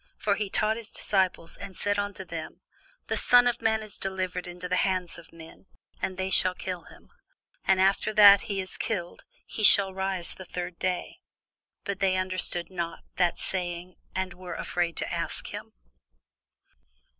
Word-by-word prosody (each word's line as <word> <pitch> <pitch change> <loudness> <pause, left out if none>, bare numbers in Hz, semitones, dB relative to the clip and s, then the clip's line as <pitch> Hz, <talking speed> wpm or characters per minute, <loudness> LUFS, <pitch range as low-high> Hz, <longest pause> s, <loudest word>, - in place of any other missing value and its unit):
For 205 - +1
he 205 0 -2
taught 215 +3 +1
his 230 -1 -8
disciples, 185 -4 -1
and 195 -2 -9
said 205 0 0
unto 205 -1 -4
them, 165 -2 -7 0.4
The - - -1
Son 245 0 +6
of 245 -1 +1
man 220 0 +1
is 215 -2 -8
delivered 185 -2 -3
into 175 +1 -6
the 180 0 0
hands 185 -3 -1
of 170 - -16
men, 165 +3 -14 0.3
and 185 - -2
they 190 0 -2
shall 185 -1 +6
kill 180 -3 -5
him; - - -17 0.5
and 190 -1 +3
after 195 +3 +3
that 200 -2 +9
he 200 -1 -1
is 185 -1 -3
killed, 175 -6 -4 0.2
he - - -6
shall 200 -2 +7
rise 190 -2 -2
the 185 - -10
third 180 -1 -6
day. 180 -1 -2 0.6
But 200 -1 -4
they 190 -1 +2
understood 185 -2 -1
not 170 -2 -4
that 175 -2 +2
saying, 180 -1 -4 0.2
and 190 -1 -2
were 180 -1 -8
afraid 175 -2 -2
to - - -1
ask - - -3
him. - - -7
185 Hz, 170 wpm, -27 LUFS, 175-200 Hz, 0.6 s, that